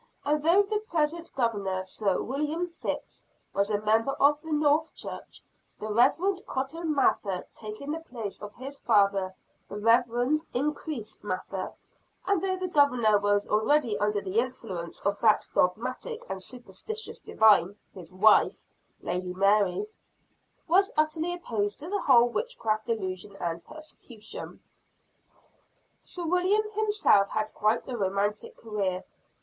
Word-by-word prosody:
And 300 +1 +1
though 340 +6 +5
the 420 +1 -1
present 335 -4 -1
Governor, 200 -7 -1
Sir 195 0 -1
William 300 +6 -2 0.2
Phips, - - -5 0.3
was 200 +1 +1
a 205 -1 +1
member 225 +5 +2
of 290 +2 +3
the 320 - -8
North 300 +1 +2
Church, - - -9 0.3
the 215 0 -4
Reverend 360 - +3
Cotton 305 +4 -2
Mather 195 -8 +1
taking 215 +7 -7
the 320 - -2
place 235 -10 -7
of 210 -1 -7
his 275 +3 -8
father, 200 -4 +2 0.3
the 205 - -6
Reverend 240 +6 +2
Increase 280 -4 -3
Mather 190 -1 -4 0.5
and 395 -4 +2
though 380 -1 0
the 370 0 -3
Governor 250 - +4
was 205 0 +2
greatly 225 +2 +2
under 210 0 +1
the 200 +3 0
influence 225 -9 -4
of 200 0 -1
that 220 -2 +4
dogmatic 255 - -1
and 190 0 -5
superstitious 250 - -8
divine 205 -3 +4 0.2
his 175 -3 -11
wife, 205 +4 +4 0.4
Lady 180 0 -3
Mary, 200 - +3 0.8
was 385 +4 +4
utterly 315 +3 +1
opposed 215 -11 -2
to 310 +4 -7
the 405 0 -1
whole 240 -3 +6
witchcraft 240 - -2
delusion 200 -3 -3
and 170 -1 -3
persecution. 240 -8 -11 1.4
Sir 350 -1 -6
William 370 +5 +2
himself 420 - +3
had 215 0 -2
quite 215 +2 +1
a 255 - -4
romantic 200 0 -1
career. 200 -5 -2
235 Hz, 135 wpm, -28 LUFS, 205-310 Hz, 1.4 s, whole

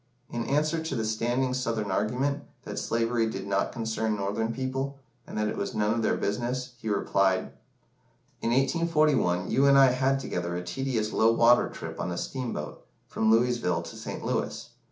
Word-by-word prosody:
In 120 -1 -2
answer 155 +3 +1
to 160 -4 -3
the 110 -2 -1
standing 120 +4 0
Southern 115 -5 -1
argument, 130 +9 0 0.2
that - - -4
slavery 115 0 0
did - - -5
not 100 0 0
concern 110 -2 -1
Northern 105 +3 -1
people, 135 +2 -3 0.3
and - - -7
that 105 0 +1
it - - -2
was 100 - -3
none 105 0 +2
of 115 - -1
their 110 - +1
business, 125 +4 -2
he 110 - -4
replied 95 -2 +1 0.9
"In - - 0
1841, 135 - +2
you 140 +1 +4
and 140 0 +6
I 135 -2 +7
had 135 +2 +1
together 85 -8 -3
a 90 - -3
tedious 110 +3 -2
low 110 +1 +4
water 120 +1 +5
trip - - -7
on - - -2
a 85 - -3
steamboat, 120 - -4 0.2
from 110 - 0
Louisville 115 -5 +2
to - - -9
St. - - -6
Louis. - - -2
115 Hz, 175 wpm, -28 LUFS, 105-130 Hz, 0.9 s, I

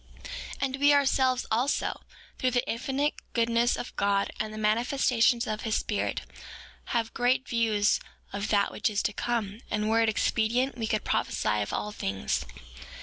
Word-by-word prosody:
5:3 - - -9 0.3
And 270 -1 0
we, 285 +1 +5
ourselves, 265 -2 +2
also, 245 +6 0 0.4
through 255 - +2
the 245 -1 0
infinite 270 +5 0 0.2
goodness 235 0 +2
of - - -6
God, 200 0 +1
and 215 - -2
the 215 - -8
manifestations 235 +2 +2
of 215 -2 -3
his 220 -2 -1
Spirit, 210 - -1 0.6
have 230 -2 -1
great 255 +2 +1
views 220 -3 +2 0.3
of 200 +1 -2
that 200 -2 +2
which - - 0
is 210 -1 -1
to 210 - 0
come; 225 -2 -2
and 210 +1 0
were 225 +1 +4
it 225 - +3
expedient, 235 +4 +1
we 225 -2 -3
could 215 -1 0
prophesy 105 0 0
of 105 - -3
all 210 - -2
things. 95 - -2
230 Hz, 165 wpm, -28 LUFS, 210-250 Hz, 0.6 s, we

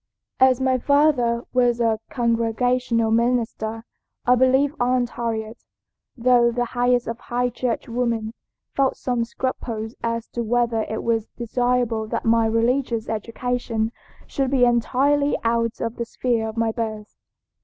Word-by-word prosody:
"As 260 -1 +5
my 260 -1 +1
father 255 -4 +2
was 245 -1 +2
a 225 -2 +1
Congregational 235 0 +1
minister, 225 -1 0 0.4
I 250 - +5
believe 265 +3 +3
Aunt 245 0 +1
Harriet, 225 -1 -4 0.5
though 240 0 +4
the 245 +1 -1
highest 245 0 +1
of 230 0 -4
High 245 +1 -1
Church 240 -1 -2
women, 230 -2 -1 0.4
felt 270 -1 +1
some 245 -2 -1
scruples 230 -2 -4
as 230 0 -2
to 240 - -4
whether 235 -1 0
it 220 - -3
was 225 -2 0
desirable 240 -2 0
that - - -3
my 225 0 +3
religious 230 +1 0
education 230 0 -2 0.3
should 270 -2 -1
be 255 -2 +4
entirely 275 +5 +2
out 230 0 0
of 230 +1 -3
the 235 - -2
sphere 230 -2 -1
of 220 - -9
my 225 -1 +1
birth. 220 -2 -5
235 Hz, 140 wpm, -23 LUFS, 225-250 Hz, 0.5 s, As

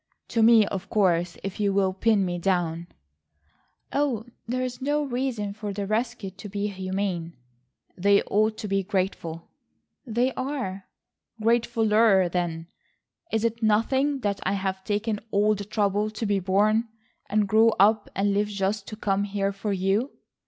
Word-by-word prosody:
"To 230 - +1
me, 225 -1 +7
of 195 -1 -5
course, 175 -4 +1
if 195 +1 -5
you 200 -1 +1
will 190 -1 +2
pin 205 0 +2
me 175 -1 -2
down." 175 -2 0 1.1
"Oh, 270 -6 0 0.2
there 255 +2 -1
is 255 +1 -5
no 295 +2 +1
reason 245 -6 -2
for 210 -1 -5
the 200 0 -3
rescued 215 -2 -3
to 205 - -7
be 205 +1 -2
humane." 185 -3 -3 0.6
"They 200 +2 +3
ought 215 +1 +1
to 215 - -5
be 195 0 +1
grateful." 185 -4 -3 0.5
"They 245 +1 0
are." 255 -8 -4 0.5
"Gratefuller 220 -4 +3
then. 170 -2 -2 0.7
Is 220 0 0
it 230 0 -1
nothing 265 +6 +2
that 200 -2 -1
I 190 - 0
have 190 -1 -2
taken 210 +1 -1
all 210 +1 +3
the 205 -1 -5
trouble 210 0 0
to 215 +1 -4
be 200 -1 +1
born 210 +5 +2 0.4
and 210 -1 +2
grow 220 +3 +5
up 210 +2 +4
and 200 +1 +1
live 205 +1 +1
just 200 0 -2
to 215 - -6
come 200 -2 0
here 200 -1 -1
for 200 +1 -4
you?" 195 +6 +1
205 Hz, 160 wpm, -26 LUFS, 195-225 Hz, 1.1 s, me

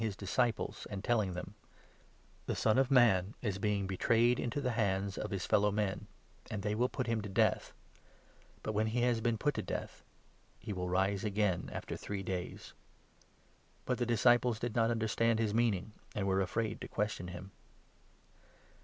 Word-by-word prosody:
j 110 - +1
,js 100 -3 -5
disciples, 110 +1 -1
and 100 -1 -5
telling 105 -7 +1
them 90 +2 -6 0.5
— - - -32
"The - - 0
Son 110 +3 +3
of 135 -1 +3
Man 110 -7 +4
is 100 -4 -1
being 105 -1 0
betrayed 115 +5 +3
into 125 +4 -2
the 125 -3 0
hands 100 -3 0
of - - -4
his 95 -2 -3
fellow 105 0 +3
men, 105 -2 -1 0.4
and 105 -3 -4
they 105 0 0
will 120 +4 +1
put 130 - -3
him 115 -2 0
to 105 - -6
death, 95 - +2 0.9
but, - - -2
when 110 +1 +1
he 120 +2 0
has 120 -2 +2
been 115 0 +1
put 145 +6 +1
to - - -2
death, - - -5 0.5
he 105 - -6
will 90 -1 -3
rise 95 +2 +1
again 100 -4 0
after - - -5
three 100 -1 -5
days." 90 -1 -5 1.1
But 125 -1 -1
the 120 - 0
disciples 120 0 +4
did 115 0 -3
not 115 -1 +3
understand 115 0 +1
his 110 -2 0
meaning 110 -4 +1 0.2
and 100 - -1
were 95 -1 +2
32 95 - +3
afraid 110 +2 -2
to - - -5
question 105 -4 -2
him. 90 +2 -8
105 Hz, 185 wpm, -33 LUFS, 95-115 Hz, 1.1 s, Man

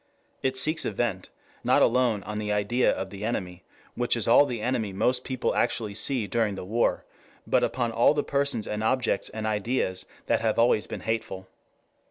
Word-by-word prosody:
It 130 0 -1
seeks 155 +4 +1
a - - 0
vent 105 -3 -2 0.3
not - - +4
alone 120 -4 +2
on 105 +1 -5
the 105 -1 -2
idea 105 +5 +2
of 95 0 -4
the 100 0 -8
enemy, 95 -5 -3 0.3
which - - 0
is - - -1
all 145 - +6
the 120 -4 -4
enemy 110 -3 -1
most 125 +6 +1
people 130 -1 -1
actually 105 -3 0
see 125 +2 0
during 110 -2 0
the 95 - -7
war, 115 +5 0 0.4
but - - +2
upon 120 -2 0
all 120 +6 +4
the 145 - +1
persons 140 -6 0
and 105 +1 -3
objects 130 +3 0
and 110 0 -5
ideas 105 -3 -1 0.2
that - - +1
have 110 -1 0
always 115 -2 +3
been - - -6
hateful. 105 -4 -3
110 Hz, 190 wpm, -26 LUFS, 105-125 Hz, 0.4 s, all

